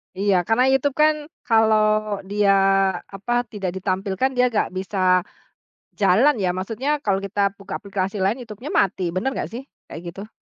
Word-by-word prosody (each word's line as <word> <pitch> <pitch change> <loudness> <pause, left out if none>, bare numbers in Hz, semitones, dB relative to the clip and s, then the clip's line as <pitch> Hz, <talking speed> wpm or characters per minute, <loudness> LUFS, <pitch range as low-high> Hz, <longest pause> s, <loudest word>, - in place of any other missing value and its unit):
Iya, 200 +1 +1
karena 225 +3 +3
YouTube 270 +1 +1
kan 310 0 +4 0.3
kalo 220 -2 +4 0.5
dia, 205 0 +3 0.6
apa, 200 +5 -3 0.2
tidak 195 -4 -3
ditampilkan 190 +5 -1
dia 250 0 +4
nggak 210 - +1
bisa 190 +1 -4 1.0
jalan 215 +9 +4
ya. 185 -2 +1
Maksudnya 225 +9 -3
kalau 195 -2 +1
kita 200 0 0
buka 200 - -6
aplikasi 195 0 -3
lain 205 +7 +1
YouTube-nya 240 +4 -8
mati. 190 -1 +1
Bener 185 +9 -1
nggak - - -3
sih, 240 +4 -6 0.2
kayak 165 - -8
gitu? 200 +2 -8
205 Hz, 155 wpm, -22 LUFS, 195-240 Hz, 1.0 s, kan